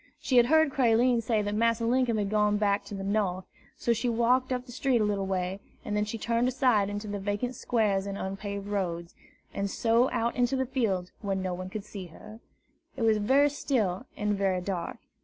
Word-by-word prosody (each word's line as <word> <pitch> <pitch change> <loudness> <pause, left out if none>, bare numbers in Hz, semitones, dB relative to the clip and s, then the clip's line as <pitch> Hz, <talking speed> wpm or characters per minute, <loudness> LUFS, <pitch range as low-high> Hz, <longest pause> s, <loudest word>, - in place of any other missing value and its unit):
She 255 - +1
had 240 0 +6
heard 315 0 +4
Creline 240 -1 +3
say 220 -2 0
that 205 0 -2
Massa 230 +1 +1
Linkum 245 -1 +2
had 205 -1 -1
gone 210 -1 +2
back 205 -1 +1
to 205 - -7
the 195 - -5
North; 195 -2 -1 0.3
so 235 - +1
she 230 +2 -1
walked 245 +3 +2
up 250 0 -2
the 250 - -11
street 255 0 +1
a - - +2
little 200 -2 -1
way, 185 0 -2 0.3
and 210 - -2
then 210 0 +1
she 215 +2 -4
turned 235 +2 0
aside 250 -6 +2
into 205 +1 -5
the 205 0 -4
vacant 205 +5 -2
squares 210 -6 0
and 200 0 -4
unpaved 200 +1 -5
roads, 175 -4 -3 0.4
and 200 0 -2
so 230 +5 +2
out 230 +1 -1
into 245 +1 +1
the 260 0 0
fields 215 -9 -1
where 200 -2 -1
no 190 -1 -2
one 185 +1 -6
could 205 +1 -6
see 195 -4 -8
her. 215 +6 -13 0.6
It 240 - -2
was 220 -1 +3
very 275 +7 +4
still 215 -10 -1
and 210 0 0
very 195 -2 +1
dark. 180 -2 -4
210 Hz, 215 wpm, -28 LUFS, 195-240 Hz, 0.6 s, had